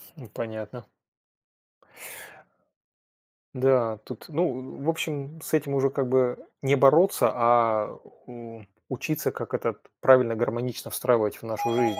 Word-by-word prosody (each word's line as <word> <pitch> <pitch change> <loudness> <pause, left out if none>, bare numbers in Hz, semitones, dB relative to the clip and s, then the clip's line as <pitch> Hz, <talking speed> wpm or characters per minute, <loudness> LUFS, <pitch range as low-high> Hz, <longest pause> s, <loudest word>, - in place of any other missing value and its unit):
Ну, 135 -7 -12
понятно. 110 +1 -8 2.7
Да, 125 -4 +2
тут, 125 - -10
ну, 145 -5 -3
в 155 - 0
общем, 155 -2 -4
с - - -9
этим 150 -2 +1
уже 135 0 +2
как 135 -1 -2
бы 125 -1 +2 0.2
не 140 0 +3
бороться, 150 +8 +5
а 115 -3 +2 0.3
у 115 -2 -11 0.3
учиться, 145 +4 -2
как - - -8
этот - - -2 0.2
правильно, 125 -3 +6
гармонично 120 +1 -3
встраивать 110 -2 +1
в - - -19
нашу 115 +1 -2
жизнь 115 -3 +1
125 Hz, 125 wpm, -26 LUFS, 115-135 Hz, 2.7 s, правильно